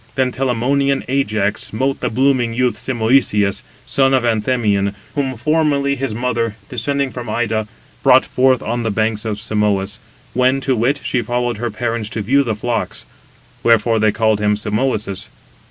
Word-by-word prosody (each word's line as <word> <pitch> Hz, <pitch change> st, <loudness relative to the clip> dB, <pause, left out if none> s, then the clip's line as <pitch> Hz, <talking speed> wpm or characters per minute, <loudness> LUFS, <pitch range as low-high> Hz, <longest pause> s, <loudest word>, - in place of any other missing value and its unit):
Then 130 Hz, -1 st, +1 dB
Telamonian 135 Hz, +2 st, 0 dB
Ajax 110 Hz, -6 st, 0 dB
smote 135 Hz, +5 st, -1 dB
the 125 Hz, -, -1 dB
blooming 125 Hz, -1 st, +1 dB
youth 125 Hz, 0 st, +1 dB
Simoïsius, 110 Hz, -5 st, +1 dB, 0.2 s
son 135 Hz, -1 st, +3 dB
of 130 Hz, -, +1 dB
Anthemion, 105 Hz, -3 st, +1 dB, 0.2 s
whom 135 Hz, -3 st, -2 dB
formerly 140 Hz, +1 st, +1 dB
his 135 Hz, -1 st, -3 dB
mother, 115 Hz, -1 st, -1 dB
descending 140 Hz, +3 st, -1 dB
from 120 Hz, -3 st, -7 dB
Ida, 110 Hz, -1 st, -1 dB, 0.3 s
brought 130 Hz, -1 st, +5 dB
forth 130 Hz, -1 st, +2 dB
on 120 Hz, +2 st, -2 dB
the 115 Hz, -, -1 dB
banks 110 Hz, +1 st, -1 dB
of 105 Hz, -2 st, -3 dB
Simois, 105 Hz, -1 st, 0 dB, 0.3 s
when, 130 Hz, +2 st, +2 dB
to 135 Hz, -1 st, +1 dB
wit, 130 Hz, +5 st, 0 dB
she 120 Hz, 0 st, 0 dB
followed 120 Hz, 0 st, -1 dB
her 120 Hz, +2 st, -2 dB
parents 115 Hz, 0 st, -3 dB
to 110 Hz, 0 st, -4 dB
view 135 Hz, +7 st, +3 dB
the 115 Hz, -6 st, -1 dB
flocks; 115 Hz, +1 st, -3 dB, 0.6 s
wherefore 115 Hz, 0 st, +3 dB
they 110 Hz, 0 st, +3 dB
called 110 Hz, -1 st, +1 dB
him 105 Hz, 0 st, +2 dB
Simoïsius. 105 Hz, -2 st, -2 dB
120 Hz, 155 wpm, -18 LUFS, 110-130 Hz, 0.6 s, brought